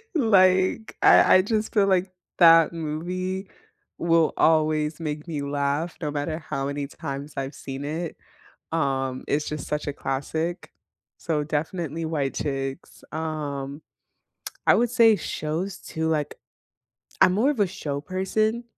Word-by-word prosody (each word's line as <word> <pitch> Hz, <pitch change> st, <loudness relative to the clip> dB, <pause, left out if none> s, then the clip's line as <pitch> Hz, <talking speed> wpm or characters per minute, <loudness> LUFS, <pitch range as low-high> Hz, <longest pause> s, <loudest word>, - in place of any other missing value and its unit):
Like, 190 Hz, -, +3 dB
I -, -, +7 dB
I -, -, +5 dB
just 215 Hz, +1 st, -1 dB
feel 200 Hz, -2 st, +4 dB
like 185 Hz, 0 st, +2 dB, 0.3 s
that 165 Hz, -1 st, +7 dB
movie 180 Hz, +4 st, -3 dB, 0.5 s
will 165 Hz, -2 st, +3 dB
always 155 Hz, -1 st, +2 dB
make 150 Hz, 0 st, -4 dB
me 150 Hz, -3 st, -3 dB
laugh 140 Hz, +3 st, -1 dB
no 150 Hz, -2 st, -2 dB
matter 150 Hz, +2 st, -3 dB
how 140 Hz, -4 st, -4 dB
many 140 Hz, 0 st, -3 dB
times 140 Hz, +1 st, -6 dB
I've 135 Hz, +1 st, -4 dB
seen 135 Hz, +1 st, -6 dB
it, 160 Hz, +2 st, -4 dB, 0.5 s
um, 135 Hz, -5 st, -1 dB
it's 150 Hz, +1 st, 0 dB
just 150 Hz, -2 st, -5 dB
such 150 Hz, 0 st, -3 dB
a 145 Hz, -, -2 dB
classic, 160 Hz, +6 st, -3 dB, 0.5 s
so 155 Hz, -3 st, -1 dB
definitely 160 Hz, +1 st, -3 dB
White 145 Hz, -4 st, -1 dB
Chicks. 135 Hz, -2 st, -4 dB
Um, 150 Hz, -2 st, -4 dB, 0.9 s
I -, -, +7 dB
would 240 Hz, 0 st, +2 dB
say 230 Hz, -3 st, +6 dB
shows 175 Hz, +3 st, -3 dB
too 160 Hz, -1 st, -3 dB
like 150 Hz, -2 st, -1 dB, 0.9 s
I'm 180 Hz, -, +6 dB
more 225 Hz, +8 st, +3 dB
of 275 Hz, -, -5 dB
a 200 Hz, -, +3 dB
show 145 Hz, -5 st, -4 dB
person 215 Hz, +7 st, -1 dB
160 Hz, 140 wpm, -25 LUFS, 145-185 Hz, 0.9 s, I